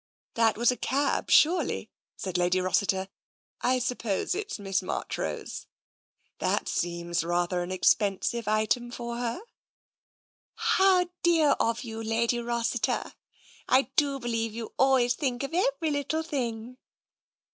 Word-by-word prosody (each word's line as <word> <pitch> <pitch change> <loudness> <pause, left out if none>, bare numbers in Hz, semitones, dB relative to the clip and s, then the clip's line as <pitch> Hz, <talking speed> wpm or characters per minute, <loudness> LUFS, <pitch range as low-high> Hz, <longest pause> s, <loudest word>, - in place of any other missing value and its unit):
" - - -72
That 225 -2 +2
was 240 +2 +4
a 250 - -4
cab, 280 +2 0
surely," 345 +4 +3 0.3
said 185 -2 -5
Lady 180 +1 +2
Rossiter. 190 +1 +1 0.3
" - - -52
I 255 - +3
suppose 245 - -1
it's 415 +2 -4
Miss 195 -2 -1
Marchrose. 185 - -4 0.7
That - - 0
seems 170 -1 -1
rather 175 +1 0
an 175 +1 -4
expensive 205 +4 +1
item 215 +3 +1
for 235 -1 -5
her.'' 240 - -3 0.8
*' - - -82 0.2
How 370 -2 +4
dear 325 -4 +4
of 230 +2 0
you, 225 -2 -6
Lady 230 +2 0
Rossiter! 235 0 -1 0.6
I 265 +1 +3
do 280 -2 +2
believe 230 -3 -2
you 230 -1 -6
always 260 -2 +4
think 255 -3 -2
of 275 - -5
every 320 -3 +1
little 290 +3 -1
thing." 245 -5 -4
235 Hz, 135 wpm, -28 LUFS, 205-275 Hz, 0.8 s, was